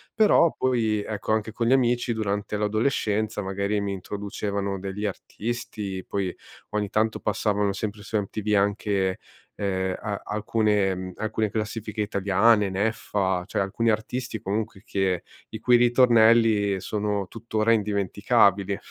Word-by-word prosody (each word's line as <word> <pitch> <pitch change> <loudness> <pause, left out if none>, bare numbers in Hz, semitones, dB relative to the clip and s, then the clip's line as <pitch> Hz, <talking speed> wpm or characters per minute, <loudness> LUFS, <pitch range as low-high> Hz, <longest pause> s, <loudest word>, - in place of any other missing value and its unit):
però 210 -6 +5
poi 110 -5 +1
ecco, 110 0 -2
anche 110 0 -1
con 115 +1 -1
gli 125 - +5
amici, 120 -2 +2
durante 105 -1 -2
l'adolescenza 110 0 0
magari 100 +1 -1
mi 100 - -2
introducevano 100 0 -3
degli 100 +2 -4
artisti 105 -2 -5
poi, 95 -2 -2 0.4
ogni 105 -1 -1
tanto, 110 +1 0
passavano 105 -1 0
sempre 105 +1 -4
su 110 - -2
MTV 105 +1 -1
anche, 100 -1 +1 0.4
uhm, 95 -2 -1
a 100 -2 -4
alcune, 105 -2 +1
mhmm, 95 0 -6
alcune 110 0 -1
classifiche 110 0 -3
italiane, 100 +1 +3
Neffa, 95 -2 -1
cioè 100 - -3
alcuni 100 +4 0
artisti 110 +2 -3
comunque 105 0 -3
che 95 -6 0 0.3
i 110 - -7
cui 120 +2 +4
ritornelli 115 -4 +4
sono 105 -1 -2
tuttora 110 +1 -1
indimenticabili. 100 -1 +2
105 Hz, 130 wpm, -25 LUFS, 100-110 Hz, 0.4 s, però